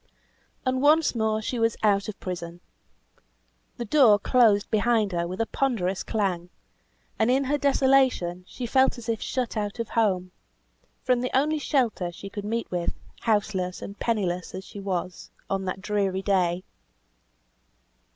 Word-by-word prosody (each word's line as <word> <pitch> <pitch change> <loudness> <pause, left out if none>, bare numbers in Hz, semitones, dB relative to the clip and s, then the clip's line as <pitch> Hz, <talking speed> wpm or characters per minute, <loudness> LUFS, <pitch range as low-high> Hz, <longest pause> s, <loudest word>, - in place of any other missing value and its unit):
And 255 0 +1
once 305 +2 +4
more 220 -2 0
she 245 +2 -2
was 225 -1 +1
out 200 -1 +3
of 210 - -8
prison. 175 -2 -6 1.2
The 240 - -4
door 235 -4 +6
closed 210 -2 +3
behind 220 -1 +2
her 170 -1 -1
with 185 +2 -6
a 225 - +2
ponderous 200 -9 -1
clang, 185 -5 -2 0.7
and 220 +1 +3
in 265 +2 +3
her 285 +2 0
desolation 265 -10 +2
she 250 - -6
felt 260 +2 +3
as 240 - -9
if 225 -1 -1
shut 250 -3 -2
out 205 0 -2
of 230 -2 -4
home 185 -6 +1 0.7
from 250 -1 +2
the 250 - -1
only 305 +3 +1
shelter 235 -11 0
she 195 +3 -9
could 205 0 -6
meet 230 +2 -3
with, 175 -1 -2 0.2
houseless 200 -5 0
and 200 - -9
pennyless 185 -6 -1
as 190 - -6
she 200 - -10
was, 185 -2 -4 0.2
on 195 -1 -1
that 185 +1 -4
dreary 195 -2 0
day. 185 -3 +1
210 Hz, 155 wpm, -26 LUFS, 185-245 Hz, 1.2 s, door